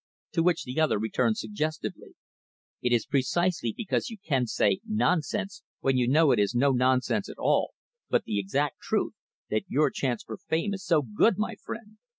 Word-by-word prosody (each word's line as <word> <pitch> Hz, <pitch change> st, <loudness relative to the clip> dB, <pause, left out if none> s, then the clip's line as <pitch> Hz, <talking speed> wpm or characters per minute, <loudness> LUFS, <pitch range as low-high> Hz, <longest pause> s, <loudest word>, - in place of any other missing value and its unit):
To 165 Hz, -, +1 dB
which 175 Hz, +1 st, +2 dB
the 130 Hz, +4 st, -4 dB
other 155 Hz, -8 st, +3 dB
returned 110 Hz, -, 0 dB
suggestively, 155 Hz, -9 st, -4 dB, 0.7 s
"It 125 Hz, -, 0 dB
is 120 Hz, -3 st, +3 dB
precisely 145 Hz, -1 st, +1 dB
because 210 Hz, -, -2 dB
you 225 Hz, -, -8 dB
can 135 Hz, -, 0 dB
say, 185 Hz, -, +2 dB
'nonsense,' 200 Hz, -2 st, 0 dB, 0.2 s
when 135 Hz, -1 st, +2 dB
you 125 Hz, -1 st, +2 dB
know 150 Hz, +2 st, +5 dB
it 120 Hz, -, +3 dB
is 100 Hz, +4 st, +1 dB
no 135 Hz, +3 st, +4 dB
nonsense 130 Hz, +10 st, +1 dB
at -, -, -9 dB
all, -, -, +1 dB, 0.3 s
but -, -, +2 dB
the 100 Hz, -, -1 dB
exact 135 Hz, +8 st, -1 dB
truth, -, -, -1 dB, 0.4 s
that 110 Hz, 0 st, 0 dB
your 150 Hz, +2 st, +2 dB
chance 125 Hz, -4 st, -2 dB
for -, -, -7 dB
fame 195 Hz, +1 st, -1 dB
is 195 Hz, -, -6 dB
so 160 Hz, -4 st, +3 dB
good, 130 Hz, -, +2 dB
my 215 Hz, +2 st, -1 dB
friend." 215 Hz, 0 st, -9 dB
150 Hz, 180 wpm, -28 LUFS, 125-195 Hz, 0.7 s, know